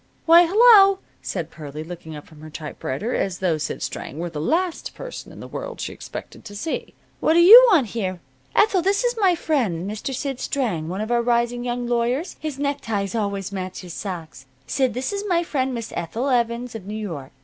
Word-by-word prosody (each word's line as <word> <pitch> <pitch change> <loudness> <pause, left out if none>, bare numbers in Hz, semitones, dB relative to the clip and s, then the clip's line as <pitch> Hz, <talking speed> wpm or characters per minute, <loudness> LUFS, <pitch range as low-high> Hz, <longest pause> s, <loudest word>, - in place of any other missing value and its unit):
"Why, 335 +1 +7
hello!" 400 -1 +7 0.2
said 170 -4 -4
Pearlie, 150 -1 -8
looking 165 -1 -9
up 150 - -9
from 155 -1 -16
her 155 - -9
typewriter 155 - -4
as 190 -2 -1
though 175 -4 0
Sid - - -4
Strang 140 - -5
were 170 +1 -4
the 150 -2 -4
last 340 - -1
person - - -8
in - - -11
the - - -8
world - - -6
she - - -4
expected - - -9
to 205 - -10
see. 315 +10 -4 0.2
"What 315 - +3
do 335 - +5
you 455 +9 +10
want 300 - +4
here? 185 -5 -3 0.4
Ethel, 405 -4 +4
this 395 +6 +1
is 485 -1 +2
my 375 -4 +4
friend, 225 - -1
Mr. 215 +6 -4
Sid 270 0 -3
Strang, 210 - -2
one 190 +3 -3
of 220 +2 -3
our 240 0 +3
rising 240 0 +1
young 245 0 -2
lawyers. 245 +7 -1
His 305 -3 -5
neckties 225 -9 -2
always 200 -3 -2
match 185 -1 -5
his 180 -3 -9
socks. 165 -9 -7 0.2
Sid, 260 - 0
this 260 +10 -2
is 400 0 -3
my 345 -2 +2
friend, 265 -5 -1
Miss 230 -3 -5
Ethel 230 +11 -2
Evans, 240 -1 0
of 210 -4 -8
New 210 - -5
York. 165 -11 -6
235 Hz, 205 wpm, -23 LUFS, -, 0.4 s, you